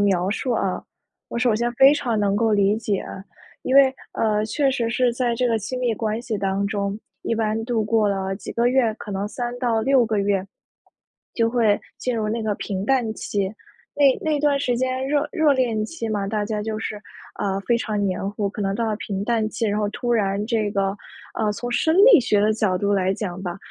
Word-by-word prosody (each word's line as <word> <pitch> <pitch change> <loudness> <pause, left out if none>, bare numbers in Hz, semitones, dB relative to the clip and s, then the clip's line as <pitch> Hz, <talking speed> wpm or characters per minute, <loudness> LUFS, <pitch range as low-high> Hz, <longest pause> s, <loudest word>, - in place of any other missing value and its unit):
描 190 -2 +2
述 245 +4 -1
啊， 195 -5 -1 0.5
我 - - -4
首 235 -2 +2
先 240 +2 0
非 270 +4 +6
常 240 -7 -1
能 200 -1 +1
够 225 0 +2
理 205 0 +3
解。 210 -3 -2 0.6
因 260 - -1
为， 270 -1 +7 0.2
呃， 215 -1 +1
确 275 +4 +1
实 235 -3 -1
是 240 +1 +1
在 240 -1 0
这 250 +2 +1
个 225 - +1
亲 220 +5 -5
密 245 -2 +1
关 220 +1 -2
系 225 -4 -3
当 195 0 -1
中， 200 -1 -2 0.3
一 230 - -1
般 220 0 -1
度 230 -2 0
过 215 -1 +2
了 195 -1 -1
几 - - -8
个 235 +1 +2
月， 245 -4 +2
可 215 - -9
能 195 +1 -2
3-6 245 +1 +1
个 215 -2 0
月， 195 -1 0 0.9
就 230 -1 +1
会 225 -4 +2 0.2
进 250 - -2
入 215 -1 -1
那 225 +2 -1
个 215 -1 0
平 195 -1 -4
淡 245 -5 +1
期。 200 -2 -2 0.4
那 280 -2 +5
那 310 -2 +1
段 285 -1 +2
时 245 -3 0
间 260 +1 -1
热 295 0 +1
热 315 -5 +3
恋 235 -5 0
期 230 -3 -5
嘛， 205 -2 -2
大 210 0 -1
家 210 0 -3
就 215 0 -3
是， 220 - -4 0.5
呃， 195 -1 0
非 240 - +3
常 215 -3 -2
黏 195 +1 -2
糊， 205 -1 -1
可 205 +1 -5
能 195 - 0
到 230 +1 -1
了 215 - 0
平 200 -2 -4
淡 225 -2 +1
期， 225 +1 -2
然 210 0 0
后 205 - 0
突 240 +3 -2
然 200 -2 +1
这 220 -3 0
个 195 0 -1 0.4
呃， 215 -2 0
从 245 +4 -5
生 320 +7 +2 0.2
理 375 - +8
学 215 -4 +1
的 215 +1 +3
角 210 -4 +1
度 200 +2 0
来 190 -1 +2
讲 190 -3 -5
吧， 175 -1 -4
220 Hz, 230 characters per minute, -23 LUFS, 205-240 Hz, 0.9 s, 理